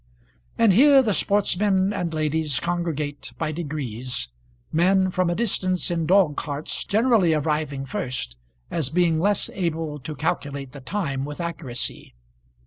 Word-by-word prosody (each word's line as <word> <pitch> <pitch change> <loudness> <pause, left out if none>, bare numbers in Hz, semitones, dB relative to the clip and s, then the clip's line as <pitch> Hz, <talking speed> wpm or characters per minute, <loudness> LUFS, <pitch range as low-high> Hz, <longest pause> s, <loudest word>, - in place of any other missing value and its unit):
And 225 -4 +5
here 275 +5 +7
the 215 -4 +1
sportsmen 200 0 +2
and 175 -4 -2
ladies 155 -2 0
congregate 155 -5 -3
by 155 -2 -1
degrees, 130 - -4 0.4
men 185 +3 +3
from 185 -1 +1
a 175 - 0
distance 185 -5 0
in 165 -2 -1
dog 180 -5 +4
carts 145 +1 -3
generally 215 -6 +3
arriving 150 -2 -1
first, 125 - -4 0.4
as 155 -6 0
being 165 0 +2
less 200 +3 +1
able 165 -5 -2
to 150 +3 -6
calculate 140 0 -3
the 140 - -10
time 140 -5 -2
with 145 +3 -6
accuracy. 160 - -4
160 Hz, 135 wpm, -24 LUFS, 145-185 Hz, 0.4 s, here